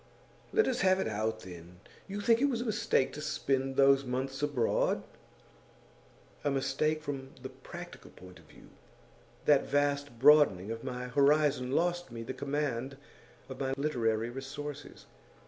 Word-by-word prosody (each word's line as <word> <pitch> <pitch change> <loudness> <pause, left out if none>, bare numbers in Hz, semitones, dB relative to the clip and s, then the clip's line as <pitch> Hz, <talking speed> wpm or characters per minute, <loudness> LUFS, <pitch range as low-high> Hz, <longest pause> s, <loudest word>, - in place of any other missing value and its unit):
'Let 440 - +3
us 255 - 0
have 185 0 +4
it - - -1
out, 110 +1 -2
then. 90 -1 -11 0.3
You 200 +1 -5
think 230 +2 +3
it 285 - +4
was 240 -3 -1
a - - -3
mistake 140 - +1
to 150 - -6
spend 135 -3 -1
those 135 0 +5
months 135 +1 -3
abroad?' 145 -6 +1 1.4
'A 145 - +1
mistake 150 +3 0
from 135 -2 -6
the 130 - -5
practical - - -11
point 90 0 -14
of 85 - -19
view. - - -17 0.8
That 145 -2 +4
vast 145 -3 0
broadening 130 -8 +5
of 115 0 -6
my 125 -1 -5
horizon 140 -1 +3
lost 175 -2 0
me 115 -1 -6
the 125 - -5
command 135 -1 -3 0.5
of 130 - -9
my 135 -1 -1
literary 115 -6 0
resources. 145 +2 -8
135 Hz, 150 wpm, -31 LUFS, 125-150 Hz, 1.4 s, those